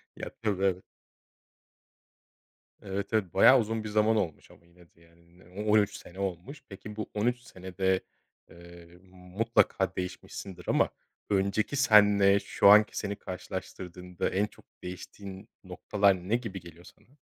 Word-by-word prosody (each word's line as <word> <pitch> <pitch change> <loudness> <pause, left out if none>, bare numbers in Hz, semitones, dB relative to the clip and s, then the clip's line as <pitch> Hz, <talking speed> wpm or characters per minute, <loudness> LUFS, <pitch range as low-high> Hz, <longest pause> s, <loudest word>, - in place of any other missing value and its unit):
Ya, - - -6
tabii, 100 -4 -1
evet. 95 -1 -2 2.0
Evet, 100 +1 -4
evet 100 -6 0
bayağı 130 +7 +7
uzun 110 -1 -2
bir 110 - -5
zaman 110 +1 +3
olmuş 90 -8 -3
ama - - -20
yine 85 0 -21
de 85 - -25
yani. 85 +1 -24
Ne - - -19 0.2
o 105 0 0
on 110 - +7
üç 105 - -1
sene 90 +2 -13
olmuş. 100 - -5
Peki 105 +1 -9
bu 110 - -5
13 120 +4 0
senede, 95 -2 -2 0.5
eee, 85 0 -15
mutlaka 95 +5 0
değişmişsindir 90 0 -7
ama - - +3 0.4
önceki 100 +5 0
seninle 105 -6 +5
şu - - +1
anki 105 +1 +6
seni 100 -1 -3
karşılaştırdığında 90 -1 -6
en 100 +2 +1
çok - - -16 0.2
değiştiğin 95 +1 -9
noktalar 100 -3 0
ne 115 - +3
gibi 115 -6 -4
geliyor 85 0 -14
sana? 135 +9 -20
95 Hz, 145 wpm, -29 LUFS, 90-105 Hz, 2.0 s, bayağı